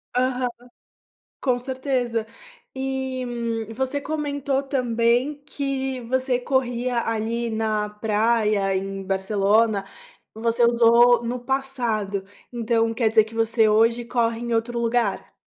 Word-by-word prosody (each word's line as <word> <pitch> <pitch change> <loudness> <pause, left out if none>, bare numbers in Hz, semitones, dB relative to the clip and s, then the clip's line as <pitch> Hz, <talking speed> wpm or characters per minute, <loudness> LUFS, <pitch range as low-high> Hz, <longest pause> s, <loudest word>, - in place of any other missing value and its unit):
Aham. 250 0 +1 0.9
Com 250 -2 +1
certeza. 255 -3 -2 0.5
E, 265 -1 -3
hum, 230 -2 -3
você 265 +4 -2
comentou 285 -2 -2
também 250 +2 0
que 270 -2 -3
você 255 +1 0
corria 245 -2 0
ali 230 +1 -1
na 215 -1 -1
praia 210 -2 +1
em 195 0 -3
Barcelona. 200 +2 +1 0.5
Você 230 +2 +1
usou 235 0 +5
no 245 +1 -3
passado. 240 -7 -2 0.3
Então 230 -1 0
quer 225 -1 +1
dizer 220 -1 +4
que 225 +1 -12
você 225 0 +3
hoje 230 +2 +3
corre 230 -1 0
em 235 0 -3
outro 235 +1 -1
lugar? 230 -3 -1
235 Hz, 115 wpm, -23 LUFS, 225-255 Hz, 0.9 s, usou